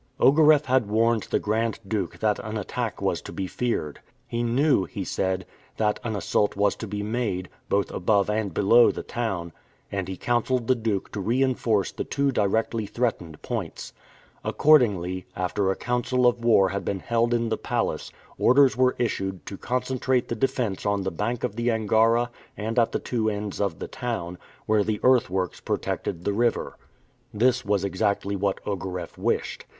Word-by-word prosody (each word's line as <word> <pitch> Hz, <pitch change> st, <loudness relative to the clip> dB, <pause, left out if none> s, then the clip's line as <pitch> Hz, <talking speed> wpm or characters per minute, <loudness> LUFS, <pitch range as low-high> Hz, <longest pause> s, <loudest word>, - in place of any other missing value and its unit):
Ogareff 150 Hz, +1 st, +6 dB
had 130 Hz, -4 st, +2 dB
warned 115 Hz, 0 st, +2 dB
the -, -, +2 dB
Grand 110 Hz, +2 st, -1 dB
Duke 100 Hz, -4 st, -2 dB
that 105 Hz, -1 st, +2 dB
an 110 Hz, 0 st, -4 dB
attack 105 Hz, -, -4 dB
was -, -, 0 dB
to -, -, -9 dB
be 95 Hz, -, -3 dB
feared. 95 Hz, -8 st, -2 dB, 0.3 s
He 115 Hz, -, -3 dB
knew, 120 Hz, -2 st, +2 dB
he 100 Hz, -, -5 dB
said, 95 Hz, 0 st, -1 dB, 0.3 s
that 105 Hz, -1 st, +1 dB
an 115 Hz, -3 st, -2 dB
assault 100 Hz, +2 st, 0 dB
was 100 Hz, 0 st, +2 dB
to 110 Hz, -, -6 dB
be 105 Hz, 0 st, -4 dB
made, 105 Hz, -5 st, -2 dB, 0.2 s
both 100 Hz, 0 st, +1 dB
above 100 Hz, +1 st, +2 dB
and 105 Hz, -1 st, -1 dB
below 115 Hz, +7 st, +5 dB
the -, -, -4 dB
town, 95 Hz, -8 st, -3 dB, 0.4 s
and 95 Hz, -2 st, -2 dB
he 95 Hz, -1 st, -5 dB
counselled 120 Hz, 0 st, 0 dB
the 130 Hz, -, +4 dB
Duke 110 Hz, -5 st, -2 dB
to 105 Hz, -, -4 dB
reinforce 115 Hz, -2 st, +1 dB
the -, -, -4 dB
two 140 Hz, -1 st, 0 dB
directly 110 Hz, 0 st, 0 dB
threatened 100 Hz, -11 st, -3 dB
points. -, -, -5 dB, 0.5 s
Accordingly, 100 Hz, -, +3 dB
after 90 Hz, +2 st, 0 dB
a 95 Hz, -, +1 dB
council 125 Hz, +1 st, 0 dB
of 120 Hz, -1 st, +2 dB
war 105 Hz, -5 st, +5 dB
had 100 Hz, +2 st, -3 dB
been 95 Hz, -2 st, -3 dB
held 120 Hz, 0 st, +1 dB
in 115 Hz, -1 st, +1 dB
the 110 Hz, -, +1 dB
palace, -, -, -2 dB, 0.3 s
orders 135 Hz, 0 st, +5 dB
were 130 Hz, +1 st, +3 dB
issued 95 Hz, -6 st, -2 dB
to 100 Hz, -, -6 dB
concentrate 125 Hz, +2 st, -1 dB
the 115 Hz, -, -1 dB
defense 125 Hz, -5 st, -1 dB
on 100 Hz, -1 st, 0 dB
the 95 Hz, -, -2 dB
bank 115 Hz, +7 st, -2 dB
of 100 Hz, -, -2 dB
the 120 Hz, +1 st, 0 dB
Angara 115 Hz, +2 st, +2 dB, 0.3 s
and 110 Hz, +3 st, -1 dB
at 115 Hz, -, +3 dB
the -, -, 0 dB
two 110 Hz, -3 st, -1 dB
ends 105 Hz, -1 st, -4 dB
of 100 Hz, -5 st, -1 dB
the -, -, -6 dB
town, 90 Hz, -8 st, -4 dB, 0.3 s
where 110 Hz, -1 st, +3 dB
the 105 Hz, 0 st, -1 dB
earthworks 95 Hz, -8 st, +2 dB
protected 85 Hz, -3 st, -3 dB
the 100 Hz, -, +1 dB
river. 115 Hz, +2 st, 0 dB, 0.6 s
This 125 Hz, +3 st, +2 dB
was 100 Hz, -2 st, 0 dB
exactly 100 Hz, +1 st, 0 dB
what 100 Hz, 0 st, -1 dB
Ogareff 95 Hz, -3 st, -4 dB
wished. -, -, -2 dB
110 Hz, 175 wpm, -25 LUFS, 100-120 Hz, 0.6 s, Ogareff